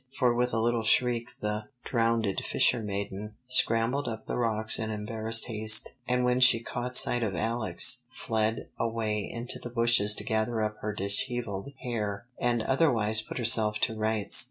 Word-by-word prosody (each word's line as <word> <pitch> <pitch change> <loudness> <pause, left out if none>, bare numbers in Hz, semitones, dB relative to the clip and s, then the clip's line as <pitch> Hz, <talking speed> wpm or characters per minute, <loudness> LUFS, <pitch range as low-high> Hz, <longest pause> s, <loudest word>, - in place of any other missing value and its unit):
For 125 -2 +2
with 125 +1 0
a 115 - -1
little 120 +1 0
shriek 120 +1 +1
the 105 0 -3 0.2
"Drowned 115 -2 0 0.2
Fishermaiden" 105 -2 -2
scrambled 125 +2 0
up 110 -1 -6
from - - -6
the - - -3
rocks 110 -2 +1
in 110 0 -3
embarrassed 110 +1 -1
haste, 110 -1 +4
and 125 0 0
when 125 0 +1
she 125 -2 +5
caught 125 +2 -3
sight 120 - +4
of 105 -5 -2
Alex, 110 -2 +3
fled 110 0 -2
away 110 -2 -3
into 120 +1 -4
the 120 - -8
bushes 115 -3 +3
to 105 - -4
gather 110 +1 -1
up 105 0 -4
her 105 - -4
dishevelled 105 +2 0
hair 110 -4 -4
and 120 -2 0
otherwise 115 -7 +1
put - - -9
herself 110 -3 +3
to 110 - 0
rights. 110 -1 +3
115 Hz, 165 wpm, -27 LUFS, 105-120 Hz, 0.2 s, she